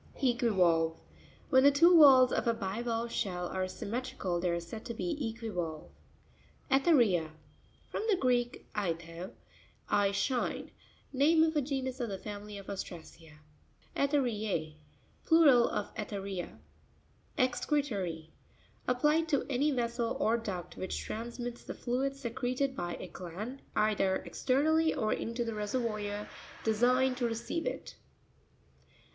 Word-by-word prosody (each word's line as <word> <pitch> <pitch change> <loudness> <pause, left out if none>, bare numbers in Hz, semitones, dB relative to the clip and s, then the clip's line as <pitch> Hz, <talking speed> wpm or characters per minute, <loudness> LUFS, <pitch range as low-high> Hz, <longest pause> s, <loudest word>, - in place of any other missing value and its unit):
E'quivaLvE.—When 195 -1 +1
the 285 - +9
two 335 +5 +6
valves 260 -4 +8
of - - 0
a 230 - +3
bivalve 230 +3 -2
shell 180 -5 -2
are 185 0 -2
symmetrical 200 -2 -3
they 180 +1 0
are 170 0 0
said 170 +6 -8
to 235 - -5
be 350 - -2 0.2
equivalve 180 -9 -5 0.8
(page 270 +4 +3
97). 330 -3 +7
Erne'r1s.—From 175 - -2
the 400 - +4
Greek, 245 -4 0
aithé, 170 -3 -3 0.6
I 200 -1 +2
shine. 245 +5 -1 0.4
Name 310 +4 +5
of 320 0 +1
a 300 - +3
genus 260 -1 -3
of 240 -2 -2
the 195 - -3
family 205 +1 -7
of 200 - -9
Ostracea 165 -5 -8 0.5
(page 280 - +1
75). 290 -1 +3
Erue'r12.—Plural 220 - +1
of - - -3
Etheria. 200 -4 -5 0.8
Excre'rory.—Applied 255 - -1
to 285 -3 +1
any 275 +4 +2
vessel 235 -2 -1
or 230 -5 +3
duct 200 -7 -5
which 185 - -3
transmits 240 +2 -5
the - - -7
fluid 265 +3 -1
secreted 255 +1 -2
by 175 -4 -3
a - - -7
gland, 205 +10 -7
either 195 -3 +2
exter. 265 +2 +1
nally 320 +1 +3
or 215 - +1
into 235 +1 -3
the 230 - -3
reseryoir 210 -1 -2 0.4
designed 250 +4 +3
to 245 -2 +1
receive 235 +8 -3
it. - - -5
230 Hz, 130 wpm, -31 LUFS, 195-260 Hz, 0.8 s, the